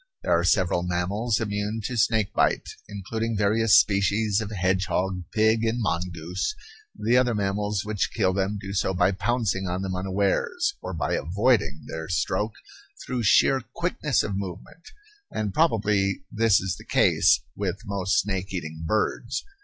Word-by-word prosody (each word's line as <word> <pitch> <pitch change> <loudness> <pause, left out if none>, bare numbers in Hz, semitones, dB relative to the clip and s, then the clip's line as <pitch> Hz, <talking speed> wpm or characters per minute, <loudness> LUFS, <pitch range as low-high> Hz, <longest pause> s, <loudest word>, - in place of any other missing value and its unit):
There - - +3
are 85 - +1
several 90 -1 +2
mammals 95 +6 -1
immune 105 0 -2
to 125 - -3
snake 110 -2 +1
bite, - - +1 0.2
including 110 +3 -3
various 105 +1 +3
species 100 +1 +1
of 105 - -4
hedgehog, 95 -2 -1
pig, 110 +1 +2
and 115 +1 0
mongoose 90 - -2 0.4
the 120 +3 +2
other 125 -2 +2
mammals 105 0 -1
which 105 -2 -1
kill 95 -4 +1
them 100 +2 -1
do 100 -1 -6
so 95 -1 0
by 90 +1 +3
pouncing 95 -1 -1
on 90 +2 -2
them 95 -1 -3
unawares 100 - 0
or 95 - -5
by - - -1
avoiding 85 - +1
their 80 +1 -6
stroke 95 +4 -1 0.5
through 125 -1 -2
sheer 130 +4 +4
quickness 150 -6 0
of 100 - -3
movement; 100 - -7 0.4
and 105 -3 -3
probably 105 - +1
this 115 -2 +3
is 95 0 -3
the - - -12
case - - +3
with 100 +1 -3
most 100 -2 0
snake 95 -1 -3
eating 80 -3 -5
birds. 110 +6 -1
100 Hz, 155 wpm, -25 LUFS, 95-110 Hz, 0.5 s, sheer